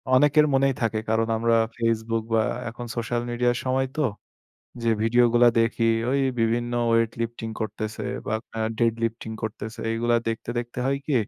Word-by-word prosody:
অনেকের 145 +3 +5
মনেই 135 0 +3
থাকে। 115 -1 0
কারণ 110 0 +2
আমরা 115 0 +2 0.2
Facebook 115 -1 0
বা 110 - +4 0.3
এখন 120 +1 -8
সোশ্যাল 120 0 -1
মিডিয়ার 120 0 +1
সময় 130 +1 +1
তো। 155 - +2 0.8
যে 115 - +2
ভিডিওগুলা 120 +1 +5
দেখি 115 0 +1 0.2
ওই 140 +1 +2 0.2
বিভিন্ন 120 +1 0 0.2
weight 115 0 +2
lifting 115 -1 -4
করতেছে 110 -1 -4 0.2
বা 110 - 0 0.2
আ - - -1 0.2
dead 115 -1 +3
lifting 115 -1 -3
করতেছে। 110 0 -5
এগুলা 120 +1 +2
দেখতে, 115 +1 -3
দেখতে 120 +1 -5
হয় 140 +1 +1
কি? 150 - 0
115 Hz, 160 wpm, -25 LUFS, 115-120 Hz, 0.8 s, অনেকের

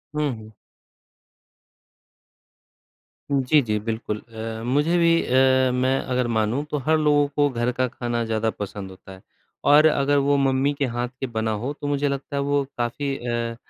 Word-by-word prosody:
हुँ, 150 -2 0
हुँ। 110 0 -12 2.8
जी, 140 +2 +3
जी 110 -4 -1
बिल्कुल। 110 0 -4
अ, 110 -1 -7
मुझे 145 +7 +2
भी 170 -1 +4
अ, 130 0 +3
मैं 130 +1 +1
अगर 125 -1 -1
मानूँ 110 +6 0
तो 150 - -1
हर 160 0 +3
लोगों 145 -1 +3
को 145 0 +3
घर 120 -1 -1
का 130 +1 0
खाना 120 -1 -3
ज़्यादा 110 0 0
पसंद 100 -2 -6
होता 95 +1 -14
है। 95 0 -12 0.5
और 150 +2 +7
अगर 145 -2 +3
वो 140 +1 +2
मम्मी 135 +1 +2
के 140 -1 -1
हाथ 120 0 -2
के 135 - -2
बना 110 -2 -2
हो 135 - -2
तो 145 - -3
मुझे 145 0 0
लगता 140 +1 -4
है 140 - 0
वो 140 0 +1
काफ़ी 135 +4 -2
अ 120 -1 -3
130 Hz, 170 wpm, -23 LUFS, 115-145 Hz, 2.8 s, और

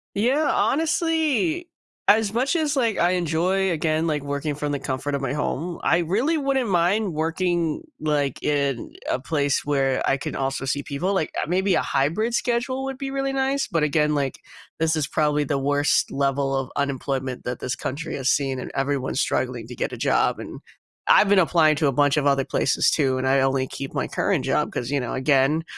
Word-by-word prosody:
Yeah, 265 +9 +2
honestly, 325 +1 +1 0.4
as 215 0 +4
much 260 +7 +1
as, 305 -3 0
like, 230 -5 +1
I 175 +1 +3
enjoy, 180 +3 +1
again, 160 -1 0
like, 150 -3 -1
working 145 +1 -3
from 150 0 -3
the 145 - -1
comfort 140 +1 -3
of 140 - -2
my 135 - -1
home, 155 +3 -3
I 170 - +3
really 215 - +1
wouldn't 275 -5 0
mind 185 +2 +1
working, 165 +1 0 0.2
like, 145 -3 -1
in 140 -4 -1 0.2
a - - 0
place 140 +1 0
where 135 -2 0
I 135 - +2
can 140 - -5
also 135 0 -2
see 140 +2 -1
people, 175 +9 -2
like, 175 -5 0
uh, - - -2
maybe 190 +2 +1
a - - +3
hybrid 190 - 0
schedule 255 +3 -1
would 270 -1 -5
be 275 -1 -4
really 275 0 -1
nice, 270 +1 0
but, 165 -6 -1
again, 150 0 +2
like, 140 -2 -2 0.4
this 160 0 +1
is 155 -3 0
probably 150 -1 +1
the 145 0 -1
worst 145 +1 +1
level 140 0 0
of 130 -1 -4
unemployment 135 -2 -2
that 125 0 -4
this 130 - -2
country 145 +5 -5
has 135 -1 -1
seen, 135 -2 +1
and - - -7
everyone's 135 -1 -1
struggling 125 -3 -1
to 125 - -8
get - - -3
a - - -6
job, - - +1
and - - -8 0.5
I've 210 - +6
been 205 - +5
applying 160 -3 +4
to 150 0 +1
a 140 - +2
bunch 145 +2 +2
of 145 - 0
other 140 -1 +3
places - - +1
too, 135 -4 +1
and 130 - -2
I 135 +1 +3
only 135 0 +1
keep 135 +1 -7
my - - -1
current - - 0
job - - 0
'cause, 125 +1 -4
you 140 -1 0
know, 125 - -4
again, 140 +3 +2
150 Hz, 205 wpm, -23 LUFS, 135-200 Hz, 0.5 s, I've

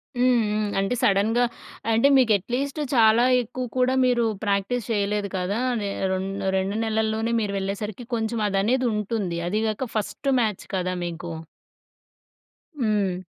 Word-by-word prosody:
హ్మ్. 250 0 +3
హ్మ్. 210 0 0
అంటే 195 +5 0
సడన్‌గా 215 +5 +3 0.5
అంటే 230 +5 +4
మీకు 250 -4 +4
అట్‌లిస్టు 265 - -3
చాలా 225 0 +5 0.2
ఎక్కువ 250 +2 -5
కూడా 255 0 +3
మీరు 245 -2 +2 0.2
ప్రాక్టీస్ 200 +4 0
చేయలేదు 205 -1 0
కదా! 185 +4 -1 0.2
నె 200 - -2 0.2
రెం 190 0 -1 0.3
2 195 +2 -1
నెలల్లోనే 220 +1 0
మీరు 200 -2 -2
వెళ్ళేసరికి 205 +4 -4
కొంచెం 225 0 -2
అదనేదుంటుంది. 210 -3 0
అది 210 +4 0
కాక 220 +3 -3
ఫస్ట్ 215 +6 -2
మ్యాచ్ 215 -4 -2
కదా! 185 0 -1
మీకు. 170 0 -5 1.5
హ్మ్. 205 -5 +1
215 Hz, 130 wpm, -24 LUFS, 200-235 Hz, 1.5 s, చాలా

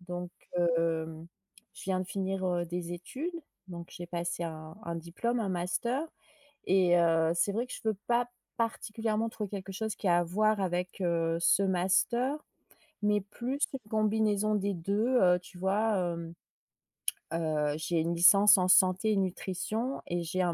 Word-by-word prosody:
Donc, 180 0 -6 0.3
heu, 165 -2 0 0.5
je - - -11
viens 185 -1 0
de - - -2
finir, 190 0 -2
heu, 175 -1 0
des 175 0 -4
études, 265 - -5 0.3
donc 170 -1 -8
j'ai 175 - -8
passé 175 0 -3
un 160 -1 -6
un 170 0 -4
diplôme, 180 +9 -2
un 210 - -1
master 235 - -1 0.6
et 180 -2 +4
heu, 165 -1 +3
c'est 185 +4 +1
vrai 230 +5 -1
que 250 - -9
je - - -8
veux 220 -1 +1
pas 240 0 +2 0.3
particulièrement 225 -1 -1
trouver 210 -3 -5
quelque 195 -1 -6
chose 220 +2 -3
qui 200 - -2
a 175 0 +5
à 175 - +1
voir 215 +4 +1
avec, 180 0 -2
heu, 165 -2 +1
ce 180 +3 +4
master, 195 +8 +2 0.7
mais 210 0 +2
plus 240 +7 -5
une 270 - -3
combinaison 215 -1 +2
des 200 0 0
2 200 +6 0
heu, 180 -1 +5
tu 180 +1 -15
vois, 205 +4 +1
hem, 170 -2 -3 1.0
heu, 155 -3 0
j'ai 165 +1 -1
une 165 +2 0
licence 195 +4 +7
en 185 -1 +2
santé 185 +4 +4
nutrition 195 +6 -2
et 175 0 -1
j'ai 175 +3 -1
un 175 -1 +1
185 Hz, 165 wpm, -30 LUFS, 170-215 Hz, 1.0 s, licence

